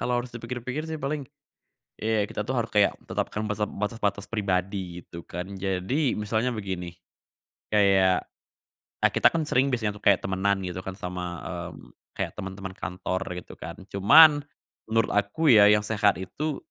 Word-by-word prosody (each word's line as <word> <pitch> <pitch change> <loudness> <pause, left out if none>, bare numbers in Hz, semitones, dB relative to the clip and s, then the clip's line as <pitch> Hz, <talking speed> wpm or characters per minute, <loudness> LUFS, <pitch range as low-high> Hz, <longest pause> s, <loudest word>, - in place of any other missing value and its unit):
kalo 120 - -1
harus 120 0 -4
dipikir-pikir 125 +6 -5
sih 160 - -3
paling, 145 -2 -4 0.7
ya 110 -1 +1
kita 105 - -5
tuh 125 +5 -2
harus 115 - -2
kayak 105 -1 +3
tetapkan 105 +1 -3
bese 105 0 -2
batas-batas 105 -1 -2
pribadi 95 -3 -2
gitu 85 - -9
kan. 90 +1 -6
Jadi 95 +9 -1
misalnya 110 +3 0
begini, 95 -6 -4 0.8
kayak, 95 -3 +4 0.7
eee, - - +3
kita - - +5
kan 160 -2 -1
sering 135 0 +2
biasanya 110 -4 -1
tuh 105 - -14
kayak 100 -2 +5
temenan 95 +1 0
gitu 90 -1 -5
kan 95 - -6
sama, 90 -2 -5 0.3
mmm, - - -15 0.2
kayak - - -3
teman-teman 95 0 -6
kantor 95 0 -3 0.2
gitu - - -13
kan, - - -8 0.2
cuman 145 +10 +8 0.5
menurut 115 +1 +1
aku 105 +10 +1
ya 105 -2 +8
yang 105 0 +3
sehat 105 -4 +2
itu, 145 +10 -3
105 Hz, 160 wpm, -26 LUFS, 95-120 Hz, 0.8 s, cuman